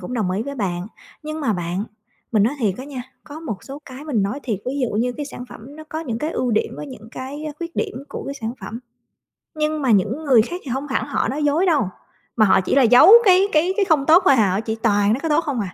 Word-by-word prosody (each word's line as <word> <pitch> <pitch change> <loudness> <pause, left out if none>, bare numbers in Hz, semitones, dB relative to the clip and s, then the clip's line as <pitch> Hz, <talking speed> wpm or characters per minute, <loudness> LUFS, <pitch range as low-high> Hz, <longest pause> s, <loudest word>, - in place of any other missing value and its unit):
cũng 250 - -6
đồng 210 -6 -1
ý 195 +4 -1
với 280 +2 -6
bạn. 185 -5 -3 0.4
Nhưng 310 +1 -5
mà 270 -7 +1
bạn, 175 +1 -3 0.5
mình 215 -3 +4
nói 240 +7 +1
thiệt 200 -5 +1
á 260 - -6
nha, 275 -3 -6 0.2
có 300 +1 -9
một 225 -12 -6
số 275 +1 -8
cái 265 +2 -10
mình 250 -10 0
nói 205 +9 -2
thiệt, 220 -6 -2
ví 255 - -1
dụ 250 - 0
như 245 +3 0
cái 290 +2 -6
sản 250 - -8
phẩm 270 +7 -12
nó 310 - -10
có 310 +1 -5
những 235 -8 -4
cái 305 +4 -2
ưu 255 -6 -1
điểm 215 - 0
với 295 - -7
những 250 -5 -11
cái 275 +4 -7
á 305 - -4
khuyết 340 0 -7
điểm - - -2
của - - -7
cái 275 - -5
sản 230 -4 -4
phẩm, 210 +4 -6 0.8
nhưng 305 0 -1
mà 260 - +1
những 220 - +1
người 250 -6 +5
khác 350 +10 -6
thì 270 - -6
hông 270 +4 -3
hẳn 265 - -1
họ - - -1
nói 295 +3 -2
dối 310 +6 +2
đâu, 320 -5 +3 0.5
mà 220 - +5
họ 190 -1 +4
chỉ 185 - -1
là 275 - +5
giấu 250 - +7
cái 380 0 +5
cái 345 +5 +2
cái 410 - +3
không 315 -7 +2
tốt 335 +4 +6
thôi 275 - +7
hà, 210 -4 +3
họ 195 - 0
chỉ 225 0 -3
toàn 205 -2 +3
nói 250 - -1
cái 325 0 -3
tốt 300 - +4
không. 285 -8 -3
265 Hz, 280 wpm, -21 LUFS, 220-305 Hz, 0.8 s, giấu